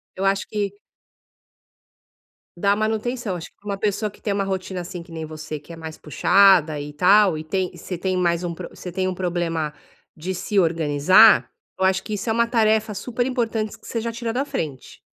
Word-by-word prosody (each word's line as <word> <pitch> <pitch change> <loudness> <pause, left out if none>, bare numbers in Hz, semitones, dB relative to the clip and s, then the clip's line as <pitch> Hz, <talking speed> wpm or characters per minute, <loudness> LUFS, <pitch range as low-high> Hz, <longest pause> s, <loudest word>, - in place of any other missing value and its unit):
Eu 190 - -4
acho 195 0 +1
que 205 -2 -2 1.8
Dar 200 +3 +2
a - - +4
manutenção. 220 0 -1
Acho 165 - -7
que - - -45
pra 205 - -16
uma 200 - -2
pessoa 210 +1 -1
que 205 - -19
tem 205 - -1
uma 200 0 0
rotina, 190 -1 -3
assim, 175 0 -6
que 170 - -17
nem 160 -1 -5
você, 155 -1 -7
que 170 - -12
é - - -8
mais 160 -1 -8
puxada 165 -1 +4
e 145 +1 -7
tal, 190 +2 +5
e 155 - -5
tem 185 +3 -1
você 175 +1 -6
tem 185 +1 -1
mais 175 -1 +1
um 170 - -3
pro - - -8
você 180 - -9
tem 185 0 0
um 185 - -2
problema 170 -4 -2 0.4
de 180 +4 -4
se 195 +3 -3
organizar, 165 +4 +5 0.3
eu 190 - -1
acho 190 0 +3
que 215 - -6
isso 210 +3 -3
é 220 - +2
uma 235 0 +2
tarefa 220 -2 +2
super 240 +4 -2
importante 230 -4 -2
que - - -21
você 230 - -3
já 230 - -3
tira 230 0 -3
da 260 +4 -1
frente. 145 - -5
190 Hz, 215 wpm, -23 LUFS, 170-215 Hz, 1.8 s, tal